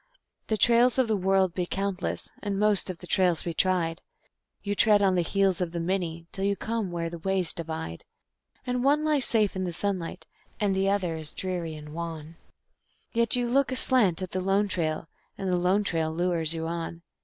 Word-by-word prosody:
_ - - -45
The 220 - 0
trails 240 +2 +4
of 260 -2 +3
the 220 - +1
world 190 -2 +2
be 180 -1 -2
countless, 195 0 -3
and 200 -2 -2
most 210 -2 +2
of 185 - -5
the 180 - -12
trails 180 -2 +2
be 170 - -3
tried; 175 -1 0 0.6
You 205 - -1
tread 205 0 +4
on 190 -1 +3
the 180 - +2
heels 190 +1 +1
of 175 -2 -2
the 170 - -2
many, 170 -2 -2
till 195 - -4
you 200 0 +1
come 220 -2 -3
where 170 -1 -3
the 170 0 -7
ways 190 -1 0
divide; 160 - -6 0.6
And 250 0 -1
one 295 +3 +3
lies 300 -4 +4
safe 215 -4 +3
in 190 - -2
the 180 - -2
sunlight, 185 -2 -3 0.3
and 200 -2 +1
the 195 +1 +1
other 185 -5 0
is 155 -1 -7
dreary 175 -4 -3
and 150 0 -10
wan, 165 -1 -6 0.8
Yet 230 -1 +3
you 245 -1 0
look 270 +3 +2
aslant 230 -9 +5
at 185 - -6
the 185 - -2
Lone 195 +2 +1
Trail, 160 -4 -2 0.3
and 195 - -4
the - - +2
Lone 180 +4 +2
Trail 165 -4 -1
lures 170 -1 +1
you 160 0 -3
on. 170 0 -5
185 Hz, 205 wpm, -27 LUFS, 170-205 Hz, 0.8 s, aslant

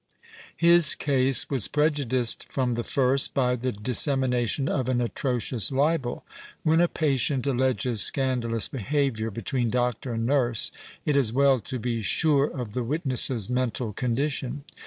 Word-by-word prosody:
His 170 -2 +5
case 135 -2 +1
was 130 -7 +2
prejudiced 140 -6 0
from 125 -2 -1
the 120 0 -2
first 135 +1 +1
by 125 -2 +2
the 125 +1 -2
dis 105 +3 +1
semination 130 -1 0
of 130 -2 -1
an 125 -1 +1
atrocious 120 -2 -1
libel. 140 -2 0 0.4
When 160 +2 +3
a 175 - +4
patient 140 -4 0
alleges 130 -4 +1
scandalous 120 -4 +1
behaviour 135 -3 -1
between 115 +3 -2
doctor 125 +1 -1
and 115 0 -2
nurse, 125 -4 +1 0.3
it 150 - +1
is 130 -6 +2
well 135 +1 +3
to 130 +4 -6
be 115 -1 -3
sure 140 - +2
of 125 -8 -6
the 125 - -2
witness's 130 - -1
mental 125 -3 -2
condition. 135 +3 -2
130 Hz, 145 wpm, -25 LUFS, 120-140 Hz, 0.4 s, His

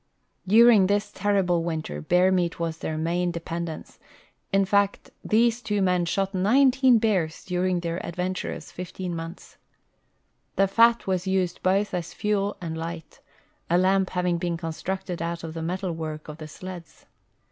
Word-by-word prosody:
During 220 -1 +7
this 205 +1 0
terriljle 195 -5 +1
winter 155 - -4
hear 180 +1 +4
meat 175 -3 0
was 165 -1 -3
their 155 - -3
main 175 +3 0
depend 170 0 -4
ence— 155 - -9 0.5
in 195 0 +3
fact, 200 +1 +1
these 235 +2 +2
two 210 -3 -1
men 180 -2 +2
shot 195 +3 -1
nineteen 255 +5 +4
l)ears 185 -8 0
during 180 -1 0
their 170 0 -3
adventurous 180 +2 -4
fifteen 180 0 -5
months, 165 +2 -8 1.0
'i'he 195 - +5
fat 230 +3 +4
was 185 -1 -1
used 185 -2 0
both 195 +2 +1
as 175 -2 -4
fuel 205 -1 -1
and 165 -2 -5
liglit, 165 0 -7 0.5
a 175 - +4
lam)) 190 +1 +3
having 180 -2 -1
l)een 170 -1 -2
constructed 180 +2 -4
out 170 0 -3
of 160 -1 -6
the 165 - -5
metal 180 +3 -2
work 155 -2 -6
of 150 +1 -9
the 155 - -7
sleds. 175 +1 -10
180 Hz, 160 wpm, -25 LUFS, 170-195 Hz, 1.0 s, During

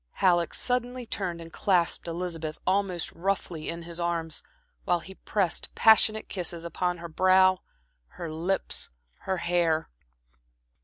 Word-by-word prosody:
Halleck 175 -3 +2
suddenly 250 0 -1
turned 180 -6 -3
and 165 0 -10
clasped 175 -3 +1
Elizabeth 165 -2 -4
almost 185 -2 +1
roughly 175 -3 -2
in 170 0 -5
his 170 0 -6
arms, 170 -2 -1 0.4
while 175 - +2
he 190 +3 -10
pressed 190 -3 -2
passionate 220 -1 +5
kisses 175 -3 -2
upon 180 +1 -1
her 170 0 -7
brow, 185 +2 +4 0.6
her 170 - -4
lips, 165 +5 -1 0.4
her 190 - +1
hair. 170 -2 +1
175 Hz, 125 wpm, -28 LUFS, 170-190 Hz, 0.6 s, passionate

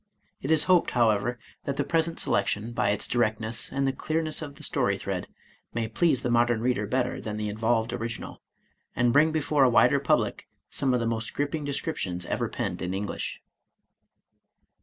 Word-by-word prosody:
It 135 - -4
is 160 -1 +5
hoped, 180 -2 +4
however, 115 +1 +2 0.3
that 140 -1 -2
the - - +1
present 165 0 0
selection, 105 +3 +1
by 105 -3 +1
its 105 0 +2
directness 110 -1 0
and 140 0 0
the 135 - +1
clear 155 +4 -1
ness 155 0 -3
of 145 -2 -7
the - - -11
story - - +1
thread, - - -4 0.5
may 115 -1 0
please 130 +3 +1
the 125 - 0
modem 120 -1 +3
reader 120 -4 0
better 125 +2 -1
than 105 -1 -4
the 105 0 -2
involved 115 +2 0
original, 115 -1 -5 0.5
and 120 -1 +2
bring 155 +3 +5
before 150 -2 +2
a 130 - +6
wider 120 - +5
public - - 0 0.2
some 130 -2 +1
of - - +1
the 115 - -1
most 115 -1 -2
gripping 145 +1 -2
descriptions 95 - -3
ever - - -1
penned - - -3
in 90 +1 -2
English. 100 +1 -4
120 Hz, 180 wpm, -27 LUFS, 110-140 Hz, 0.5 s, a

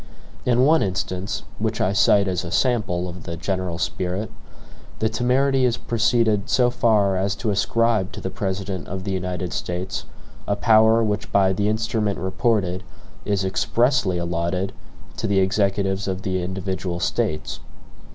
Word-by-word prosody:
In 125 +1 +4
one 160 +2 +5
instance, 95 0 -2 0.2
which 110 0 -1
I 95 - +1
cite 100 0 +4
as 90 -2 -1
a 85 - -5
sample 95 -6 +1
of 90 0 -8
the 85 +1 -6
general 90 0 -2
spirit, 95 +4 -2 0.7
the 110 - +1
temerity 130 +4 +2
has 120 -1 +1
proceeded 110 -2 +1
so 125 -1 +3
far 105 -5 +2
as 100 +3 0
to 110 -3 -1
ascribe 110 -1 +1
to - - -6
the 95 - -4
President 95 -1 -3
of 95 0 -5
the 100 - -3
United 90 -1 -3
States 90 +1 -3 0.4
a 100 - +1
power 110 +1 +5
which 105 -1 -2
by 95 -1 +4
the 100 +2 0
instrument 110 -1 0
reported 95 -2 0 0.4
is 100 -2 0
EXPRESSLY 115 +1 +1
allotted 85 +3 -1 0.4
to - - -2
the 100 - +1
Executives 95 0 +1
of 95 0 -3
the 95 -1 -1
individual 95 -1 -3
States. 75 -2 -1
100 Hz, 150 wpm, -23 LUFS, 95-110 Hz, 0.7 s, one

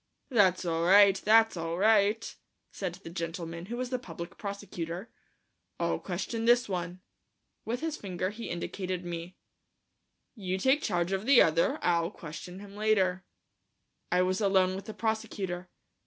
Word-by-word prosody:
"That's 190 -6 +3
all 165 -1 0
right, 195 +2 +7
that's 225 0 +5
all 165 0 -3
right," 215 +2 +3 0.4
said 185 -3 -4
the - - -7
gentleman, 170 0 -5
who 240 +3 -4
was 255 0 -3
the 255 - 0
public 170 -6 -8
prosecutor, 200 -2 -6 0.7
"I'll - - 0
question 230 -1 -3
this 240 +1 +4
one." 180 -1 -4 0.6
With 240 +2 -2
his 320 -1 -2
finger 185 -1 -3
he 225 +2 -7
indicated 180 +1 -4
me. 170 +1 -6 1.0
"You 190 -5 -3
take 265 +8 +3
charge 175 -3 0
of 195 +4 -2
the 275 -2 +7
other; 165 +1 +2
I'll 170 -1 +2
question 180 +1 -9
him 200 -1 -11
later." 195 -3 +1 0.9
I 180 0 +4
was 185 +2 0
alone 190 -2 +3
with 195 0 -7
the 220 - -8
prosecutor. 190 -5 -3
190 Hz, 150 wpm, -29 LUFS, 175-215 Hz, 1.0 s, right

